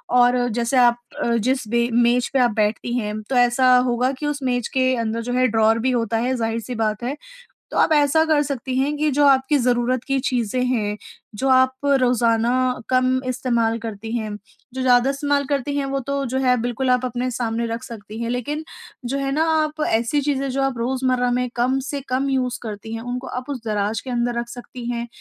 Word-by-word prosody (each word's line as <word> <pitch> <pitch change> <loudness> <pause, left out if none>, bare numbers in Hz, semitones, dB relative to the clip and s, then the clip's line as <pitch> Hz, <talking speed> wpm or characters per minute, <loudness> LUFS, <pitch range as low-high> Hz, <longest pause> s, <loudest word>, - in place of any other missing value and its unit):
और 245 0 +4
जैसे 235 +3 0
आप 240 -1 +5 0.3
अ, 235 0 +1
जिस 255 +1 0
बे 235 +2 +1
मेज 240 +1 +3
पे 270 - +3
आप 245 -2 +3
बैठती 215 +2 0
हैं 215 -1 -3
तो 265 - -1
ऐसा 250 +1 +4
होगा 250 +2 +1
कि 300 - -4
उस 295 -1 -2
मेज 245 -2 0
के 260 0 +3
अंदर 230 -1 -2
जो 245 +1 -4
है 255 0 +3
ड्रावर 225 0 +3
भी 260 - +3
होता 230 -2 0
है 250 +3 0
ज़ाहिर-सी 230 +1 -3
बात 215 0 -1
है। 260 +4 -2 0.6
तो - - -3
आप - - +3
ऐसा 300 +1 +4
कर 310 -2 +3
सकती 260 -2 -3
हैं 280 +3 +1
कि 305 0 +1
जो 290 0 +4
आपकी 270 +2 +4
ज़रूरत 245 0 +1
की 275 - -1
चीज़ें 250 -2 -1
हैं, 210 -5 -1 0.4
जो 265 +6 -1
आप 260 0 +4 0.3
रोज़ाना 235 -1 +2 0.4
कम 255 0 +2
इस्तेमाल 235 -3 0
करती 225 -1 -6
हैं। 215 -2 -4 0.4
जो 260 - -4
ज़्यादा 250 0 +4
इस्तेमाल 280 0 0
करती 285 0 -1
हैं 280 - 0
वो 275 0 -2
तो 280 0 -1
जो - - +1
है 250 0 +4
बिल्कुल 245 +2 -1
आप 250 0 +2
अपने 250 +1 -2
सामने 235 -1 -2
रख 230 +2 -4
सकती 215 -2 -9
हैं 230 - -2
लेकिन 270 +6 -3 0.4
जो 265 +3 -2
है 275 0 -2
ना, 305 +3 +2
आप 310 -1 0
ऐसी 235 +6 +1
चीज़ें 275 -1 -1
जो 270 +1 -1
आप 270 -2 -1
रोज़मर्रा 255 +1 0
में 250 0 0
कम 255 +3 +1
से 285 -1 -3
कम 265 +2 0
यूज़ 255 -2 -1
करती 220 0 -6
हैं 225 - -5
उनको 245 +2 -5
आप 250 +3 -6
उस 260 -5 -4
दराज 210 0 -1
के 260 - -9
अंदर 240 0 -1
रख 235 0 -5
सकती 245 0 -9
हैं, 235 0 -3
250 Hz, 215 wpm, -21 LUFS, 235-265 Hz, 0.6 s, आप